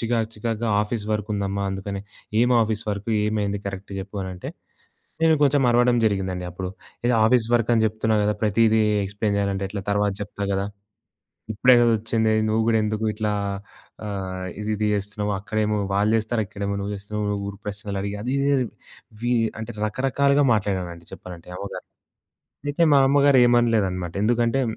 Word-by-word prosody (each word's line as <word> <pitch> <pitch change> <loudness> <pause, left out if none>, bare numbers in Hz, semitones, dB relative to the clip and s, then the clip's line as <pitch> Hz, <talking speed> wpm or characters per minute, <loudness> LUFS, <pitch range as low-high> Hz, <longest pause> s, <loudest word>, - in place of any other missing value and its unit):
చికాకు 115 -1 0
చికాకుగా 115 +1 -2
ఆఫీస్ 105 0 -3
వర్కుందమ్మా 100 -2 -2
అందుకని 100 +1 -4 0.4
ఏమి 125 +1 +4
ఆఫీస్ 110 0 -2
వర్క్ 100 +2 -4 0.2
ఏమైంది 105 -1 -1
కరెక్ట్ 100 0 -6
జెప్పు 100 +1 -6
అనంటే, 90 -1 -6 0.7
నేను 160 -1 +5
కొంచుం 140 -1 +3
అరవడం 120 0 +4
జరిగిందండి. 95 -3 -1
అప్పుడు 90 +1 -5 0.4
ఇది 125 - +3
ఆఫీస్ 115 -1 +3
వర్కని 115 -1 +2
జెప్తున్నా 110 0 0
గదా! 105 0 +2
ప్రతీదీ 110 +1 +3 0.2
ఎక్స్‌ప్లెయిన్ 100 +1 -1
జేయాలంటే 100 -1 -1
ఎట్లా 100 0 -4
తర్వాత 105 0 +2
జెప్తా 100 0 -5
గదా! 100 +1 -1 0.9
ఇప్పుడే 125 +4 +5
గదా 120 -1 +4
ఒచ్చింది 110 0 0 0.2
నువ్వు 110 +1 +2
గూడా 110 -1 +4
ఎందుకిట్లా 105 0 -1 0.8
ఆహ్, 95 -2 -4 0.2
ఇదిది 105 0 -1
జేస్తున్నావక్కడేమో 105 +1 -1 0.2
వాళ్ళు 105 +2 +2
చేస్తారు, 110 0 0
ఇక్కడేమో 100 +1 -4
నువ్వు 100 +1 -3
చేస్తున్నావు. 105 +1 -3
ఊరు 100 0 -6
ప్రశ్నలడిగి 100 0 -4
అదిది 140 +3 0 0.7
వి 120 +1 +1 0.3
అంటే 110 +1 -6
రకరకాలుగా 140 +5 +2
మాట్లాడనండి 90 -5 -2
చెప్పాలంటే. 90 -1 -10
ఏమో 100 - -5
గానీ, - - -8 0.8
అయితే 145 +4 +1
మా 140 - +6
అమ్మగారేమనలేదనమాట. 120 -10 +3
ఎందుకంటే, 120 +3 +2
105 Hz, 140 wpm, -23 LUFS, 100-115 Hz, 0.9 s, మా